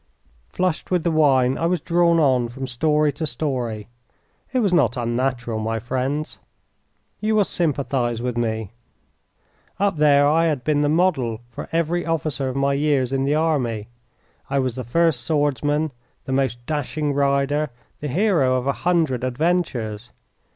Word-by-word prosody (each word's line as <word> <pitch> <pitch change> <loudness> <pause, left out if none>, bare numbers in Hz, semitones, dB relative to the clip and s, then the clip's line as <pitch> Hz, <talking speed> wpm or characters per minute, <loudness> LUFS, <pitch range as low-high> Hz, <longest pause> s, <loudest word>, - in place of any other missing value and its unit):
Flushed 180 -3 -2
with 180 -3 +1
the 170 - +1
wine, 135 -5 +3
I 165 - +1
was 180 0 +1
drawn 170 +1 +2
on 130 -5 +2
from 135 +3 -6
story 150 +4 +1
to 155 +3 -3
story. 120 -6 -3 0.6
It 260 - -1
was 205 -7 +2
not 130 -7 +3
unnatural, 120 -1 -1
my 110 +1 -2
friends. 130 +6 -3 0.8
You 215 0 0
will 210 - +5
sympathise 135 - -1
with 125 0 -3
me. 110 -3 -2 1.1
Up 200 -4 +1
there 145 -1 +5
I 165 +3 +3
had 150 -6 0
been 150 -1 +1
the 145 - +2
model 145 -9 +1
for - - -8
every 170 +1 0
officer 155 -4 -1
of 130 - -5
my 140 0 +1
years 140 -3 +1
in 135 0 +1
the 145 +2 +2
army. 125 -10 0 0.6
I 140 - 0
was 130 -3 0
the 130 +1 -5
first 160 +2 +2
swordsman, 145 0 0 0.3
the - - -5
most 125 -3 -1
dashing 150 0 -2
rider, 140 +1 +1 0.3
the 150 - -4
hero 155 - +2
of 125 0 -1
a 140 - +1
hundred 160 -8 +1
adventures. 125 -6 -1
140 Hz, 160 wpm, -22 LUFS, 125-160 Hz, 1.1 s, will